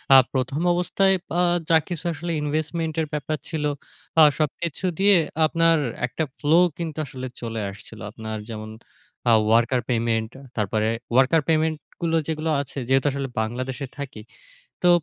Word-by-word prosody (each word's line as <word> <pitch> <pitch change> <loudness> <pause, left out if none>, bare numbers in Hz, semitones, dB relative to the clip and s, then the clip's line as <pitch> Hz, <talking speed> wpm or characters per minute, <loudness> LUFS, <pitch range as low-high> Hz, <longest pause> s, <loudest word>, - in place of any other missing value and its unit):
আ - - +12 0.2
১ম 135 +4 -1
অবস্থায় 190 +2 +2 0.3
আ - - +5 0.3
যা 165 - +7
কিছু 175 -2 -5
আসলে 170 +2 -4
investment 155 +2 -1
এর - - 0
ব্যাপার 150 +1 -2
ছিল 155 -3 -2 0.6
আ - - +10 0.2
সবকিছু 160 +4 -2
দিয়ে 200 -1 +6 0.3
আপনার 165 +1 +3 0.3
একটা 160 +6 -3 0.2
flow 160 +4 +5
কিন্তু 160 -3 -4
আসলে 130 0 -6
চলে 115 -2 -3
আসছিল। 100 +2 -11
আপনার 110 0 -6
যেমন 110 -1 -6 0.6
আ - - +7 0.2
worker 120 +2 +3
payment 115 -2 +1 0.3
তারপরে 105 +1 0 0.3
worker 135 +5 +5
payment 155 0 +2 0.2
গুলো 165 -1 +2
যেগুলো 160 0 -2
আছে 140 - -8
যেহেতু 135 +2 +3
আসলে 140 0 -3
বাংলাদেশে 130 +4 -3
থাকি। 135 -6 -6 0.6
তো 180 - +5
145 Hz, 150 wpm, -24 LUFS, 120-165 Hz, 0.6 s, আ